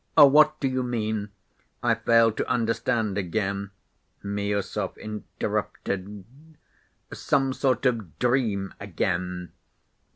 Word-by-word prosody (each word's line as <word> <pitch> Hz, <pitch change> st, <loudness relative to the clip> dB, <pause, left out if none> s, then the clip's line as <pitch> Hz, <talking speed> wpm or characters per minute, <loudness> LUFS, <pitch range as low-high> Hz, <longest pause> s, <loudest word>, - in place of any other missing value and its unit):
"What 150 Hz, +1 st, +7 dB
do 135 Hz, -, 0 dB
you 130 Hz, 0 st, 0 dB
mean? 110 Hz, -4 st, -2 dB, 0.5 s
I 120 Hz, -1 st, +4 dB
fail 115 Hz, 0 st, +4 dB
to -, -, -3 dB
understand 115 Hz, -3 st, 0 dB
again," 100 Hz, +1 st, -2 dB, 0.5 s
Miüsov 100 Hz, 0 st, -2 dB
interrupted. 100 Hz, -2 st, -4 dB, 0.9 s
"Some 135 Hz, -2 st, +1 dB
sort 130 Hz, -1 st, 0 dB
of 115 Hz, -9 st, 0 dB
dream 115 Hz, -6 st, 0 dB
again. 90 Hz, -2 st, -2 dB
110 Hz, 95 wpm, -26 LUFS, 100-125 Hz, 0.9 s, What